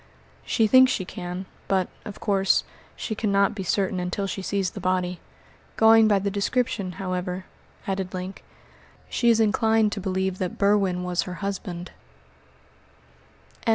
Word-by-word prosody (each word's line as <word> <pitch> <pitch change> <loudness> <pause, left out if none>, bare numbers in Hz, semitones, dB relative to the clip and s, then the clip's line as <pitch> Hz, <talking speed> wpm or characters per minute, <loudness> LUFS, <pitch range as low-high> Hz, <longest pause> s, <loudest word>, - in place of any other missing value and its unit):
"She 225 - +2
thinks 260 +3 +6
she 185 - -1
can, 180 +1 -6 0.2
but, 190 -2 +1 0.2
of 210 -3 -8
course, 195 -1 +2 0.3
she 220 - -4
cannot 200 -2 +2
be 205 - -5
certain 190 0 0
until 180 +3 -2
she 195 0 -4
sees 195 -1 -1
the - - -7
body. 180 -1 -1 0.6
Going 225 0 +7
by 205 -2 +4
the 200 +1 -1
description, 200 -2 -1
however," 185 +1 -3 0.4
added 190 -1 -2
Link, 185 +1 -6 0.7
"she 235 - +2
is 230 -1 +4
inclined 220 0 +3
to 200 - -4
believe 190 0 -1
that 185 -2 -3
Berwin 200 -3 +2
was 180 0 0
her 180 - -5
husband." 185 -3 -5
195 Hz, 145 wpm, -25 LUFS, 185-210 Hz, 0.7 s, Going